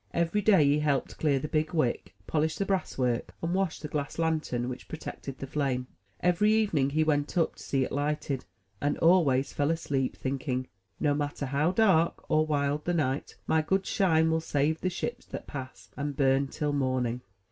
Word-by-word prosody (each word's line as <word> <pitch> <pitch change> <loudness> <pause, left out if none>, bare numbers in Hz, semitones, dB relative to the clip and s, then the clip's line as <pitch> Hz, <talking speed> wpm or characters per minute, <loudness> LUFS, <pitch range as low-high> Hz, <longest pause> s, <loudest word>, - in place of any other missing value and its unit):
Every 170 +5 +1
day 195 -7 +5
he 145 +1 +3
helped 145 -3 -1
clear 145 -3 +2
the 135 - -3
big 155 +2 -1
wick, 125 - 0
polish 160 +4 0
the 195 - -1
brass 190 -1 -1
work, 125 -2 -1
and 170 +1 0
wash 190 -3 0
the 150 - -5
glass 145 -1 -3
lantern 155 -7 0
which 125 0 -6
protected 140 -4 -7
the 135 - -5
flame. 135 -2 -1 0.4
Every 180 +4 +3
evening 200 -11 +2
he 155 +3 +2
went 150 +2 0
up 165 - +1
to - - -11
see 135 -1 0
it - - -4
lighted, 145 -1 -1 0.4
and 145 0 0
always 155 -6 +3
fell 145 0 +1
asleep, 140 -5 -1
thinking, 130 -1 -2 0.3
'*No 145 -2 +2
matter 145 0 -2
how 145 +5 +1
dark 185 -5 +3
or 155 0 +3
wild 145 0 0
the 175 - +1
night, 140 -3 -1
my 160 - +3
good 190 +5 0
Shine 160 -4 +3
will 160 0 +1
save 155 +1 0
the 185 - +1
ships 240 +7 -4
that - - -7
pass, 130 -3 -8
and 145 -1 -3
bum 135 0 +3
till 145 +1 -2
morning. 130 -3 0
150 Hz, 190 wpm, -29 LUFS, 135-165 Hz, 0.4 s, day